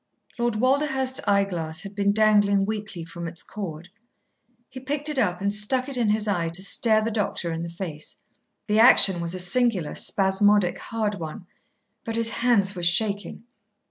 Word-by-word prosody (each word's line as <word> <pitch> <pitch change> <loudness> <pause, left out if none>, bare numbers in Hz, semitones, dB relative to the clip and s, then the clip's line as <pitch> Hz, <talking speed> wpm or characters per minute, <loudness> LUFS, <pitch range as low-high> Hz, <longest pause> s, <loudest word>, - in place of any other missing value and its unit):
Lord 240 -2 0
Walderhurst's 265 +2 0
eyeglass 180 -6 -1
had 200 -1 -9
been 200 0 0
dangling 205 -2 +3
weakly 205 -5 -6
from 170 0 -8
its 165 0 -4
cord. 175 -4 -8 0.8
He 260 - -10
picked 290 +3 -1
it 295 -3 0
up 180 -6 -1
and 200 +1 0
stuck 250 +5 0
it 275 - -2
in 235 -4 +1
his 215 0 0
eye 175 -5 -1
to 175 +3 -1
stare 220 +2 +2
the 225 - -2
doctor 195 -5 -3
in 165 - -5
the 170 - -5
face. 170 -3 -7 0.5
The 210 0 +1
action 195 -6 +7
was 170 +1 -4
a - - -5
singular, 185 -2 0
spasmodic, 195 -1 +1
hard 215 -3 -3
one. 160 +2 -8 0.6
But 225 - -3
his 230 0 +1
hands 230 -5 +1
were 175 - -6
shaking. 200 +5 +1
205 Hz, 175 wpm, -24 LUFS, 180-230 Hz, 0.8 s, action